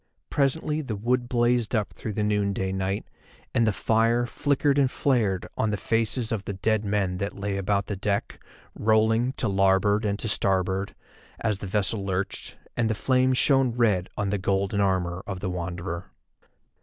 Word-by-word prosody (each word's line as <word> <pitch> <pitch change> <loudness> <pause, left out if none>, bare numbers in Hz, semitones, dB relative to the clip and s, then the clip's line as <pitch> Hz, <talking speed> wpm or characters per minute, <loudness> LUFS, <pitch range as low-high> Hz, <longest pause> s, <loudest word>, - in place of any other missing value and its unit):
Presently 150 +2 +1
the 120 -7 -4
wood 120 +4 0
blazed 120 -1 +2
up 105 -2 -1
through 110 - -5
the 105 - -1
noonday 100 -2 0
night, 95 +1 -2 0.5
and 115 -1 +3
the - - +4
fire 115 +4 +2
flickered 140 +2 +1
and 135 -2 +4
flared 110 -10 +1
on 110 - +1
the 105 - -1
faces 115 +2 -1
of 105 -3 -2
the 100 - -3
dead 110 +3 0
men 100 -3 0
that 100 +2 -3
lay 100 0 -2
about 100 +1 0
the 100 - -3
deck, 100 +1 -2 0.3
rolling 110 +3 +2
to 125 - -1
larboard 95 +2 +3
and 100 -1 0
to 110 - -4
starboard, 95 -1 0 0.5
as 105 -4 0
the 95 - -5
vessel 100 +1 0
lurched, 95 0 -3 0.2
and 115 -2 +1
the 110 - 0
flame 130 +2 +2
shone 135 -1 +3
red 105 -7 +2
on 100 -2 -1
the 105 - 0
golden 100 +1 0
armour 95 -2 0
of 95 -2 -4
the 95 -1 -3
Wanderer. 85 0 -4
105 Hz, 175 wpm, -26 LUFS, 95-120 Hz, 0.5 s, the